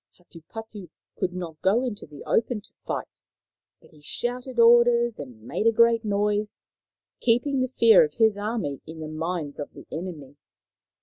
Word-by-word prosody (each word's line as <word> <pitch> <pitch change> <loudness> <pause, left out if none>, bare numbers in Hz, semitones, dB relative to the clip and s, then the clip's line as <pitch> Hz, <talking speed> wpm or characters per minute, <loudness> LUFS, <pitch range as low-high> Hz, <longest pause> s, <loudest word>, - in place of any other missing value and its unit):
Hatupatu 185 +3 -11 0.3
could 180 - -1
not 175 -3 -7
go 210 +7 +3
into 240 -5 -5
the 145 -1 -11
open 230 0 0
to - - -20
fight, - - -5 0.6
but - - -21
he 155 -2 -20
shouted 245 - -4
orders 235 0 +5
and 125 -6 -10
made 210 - -1
a - - +6
great 230 0 +4
noise, 210 0 -1 0.6
keeping 250 +4 +2
the 255 - +1
fear 230 -3 +6
of 150 -1 -3
his 220 -2 +4
army 205 - -3
in 160 0 -9
the 155 - -5
minds 155 -1 -4
of 145 - -6
the - - -12
enemy. 155 -5 -7
205 Hz, 165 wpm, -25 LUFS, 160-235 Hz, 0.6 s, a